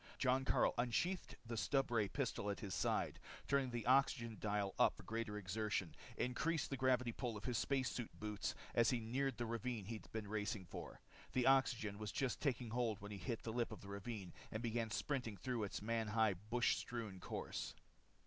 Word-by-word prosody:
Jon 130 0 +3
Karyl - - +4
unsheathed 170 +10 +1
the 115 - -4
stubray 120 -3 +2
pistol 100 - -1
at 100 - -2
his 100 -3 -3
side, 85 - +1 0.3
turned 140 -2 +2
the 120 -2 -2
oxygen 125 -3 +4
dial 105 -2 0
up - - +6
for - - -10
greater 110 -2 -2
exertion, 105 -2 -1 0.2
increased 155 +7 0
the - - +1
gravity 125 -2 +3
pull 115 -2 -3
in 105 - -9
his 125 -4 +1
space 135 -2 +2
suit 120 -3 -3
boots 105 -2 -2 0.2
as 115 -1 +5
he 125 - +2
neared 125 +2 0
the 120 - -1
ravine 115 -2 -2
he'd 110 +1 -6
been 110 -2 -3
racing 105 -1 -1
for. 90 - -7 0.3
The 125 -1 +3
oxygen 120 -6 +4
was 105 -3 -3
just 130 +7 0
taking 125 -5 0
hold 115 -3 +1
when 100 +1 -7
he 100 - -5
hit 110 +6 -3
the 110 - -3
lip 120 -1 0
of 110 - -7
the 100 - -9
ravine 100 -2 -5 0.2
and 110 +2 -3
began 115 -1 0
sprinting 125 -4 -1
through 120 +1 -1
its 100 - -4
man 115 0 0
high 110 -1 +4
bush 110 +6 +1
strewn 110 -6 -4
course. - - -4
115 Hz, 195 wpm, -41 LUFS, 105-125 Hz, 0.3 s, up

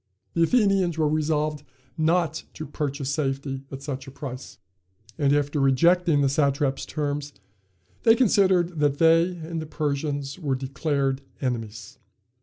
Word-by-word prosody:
The 170 - 0
Athenians 195 -3 +3
were 155 -1 +2
resolved 150 -1 0 0.3
not 160 0 +1
to 155 - -6
purchase 140 -1 -3
safety 135 -2 -2
at 135 0 -7
such 135 -1 -5
a - - -8
price, 130 -2 -8 0.6
and 140 -3 +1
after 145 +1 +1
rejecting 160 +4 +3
the 140 - +3
satrap's 140 0 0
terms, 145 -1 -3 0.7
they 225 -1 +6
considered 190 -8 +3
that 145 -1 +2
they 165 +2 +5
and 165 0 -5
the 155 - -7
Persians 145 -1 -3
were 140 -6 -1
declared 135 0 -1 0.2
enemies. 115 -5 -4
145 Hz, 135 wpm, -25 LUFS, 135-165 Hz, 0.7 s, they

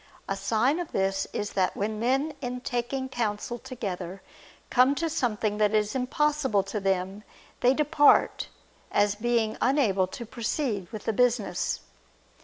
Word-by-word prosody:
A 195 - -1
sign 235 - +1
of 350 - -5
this 195 0 0
is 205 - -3
that 185 -1 +1
when 210 +1 -2
men 270 +6 +1
in 250 -1 -4
taking 250 +2 -2
counsel 240 -1 -3
together 195 -7 -6 0.5
come 255 +3 +5
to 330 +3 -1
something 215 -7 -1
that 210 0 +3
is 210 0 +1
impossible 265 -4 +1
to 195 +2 -4
them, 195 +1 -1 0.4
they 250 +2 +4
depart, 295 0 +4 0.4
as 205 -1 +3
being 225 0 0
unable 220 -9 +3
to 235 +5 -7
proceed 225 - -2
with 215 - -7
the 225 - +1
business. 230 -5 +1
225 Hz, 145 wpm, -27 LUFS, 200-260 Hz, 0.5 s, come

